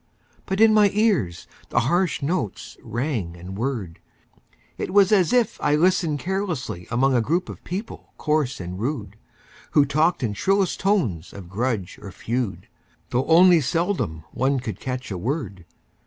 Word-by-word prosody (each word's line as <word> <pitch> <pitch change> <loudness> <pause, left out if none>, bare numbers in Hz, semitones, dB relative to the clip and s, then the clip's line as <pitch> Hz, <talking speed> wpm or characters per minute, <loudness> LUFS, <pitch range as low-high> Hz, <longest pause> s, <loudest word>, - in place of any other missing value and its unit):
But 190 0 -2
in 220 0 +6
my 210 -1 +6
ears 165 - +1 0.2
the 120 - +2
harsh 175 +5 +1
notes 145 - -3
rang 115 - -3
and 90 +2 -8
whirred; 110 -7 -3 0.8
It - - -3
was 200 0 +5
as 195 -2 +4
if 245 -4 +1
I 145 0 +3
listened 170 -2 +2
carelessly 160 - -3
Among 135 +3 +2
a 120 - +3
crowd 170 +9 -1
of - - -12
people 195 +6 -6
coarse 150 -4 0
and 90 +1 -6
rude, 115 -5 -3 0.6
Who 145 - +5
talked 155 +3 +1
in 110 -4 0
shrillest 195 - +1
tones 145 - 0
of 95 -4 -10
grudge 110 -2 -2
or 100 - -8
feud, 115 +2 -3 0.4
Though 125 +2 +1
only 175 0 +6
seldom 130 - -1
one 135 +1 +1
could 110 -6 -6
catch 125 -3 -5
a 95 - -3
word. 115 - -3
135 Hz, 155 wpm, -23 LUFS, -, 0.8 s, in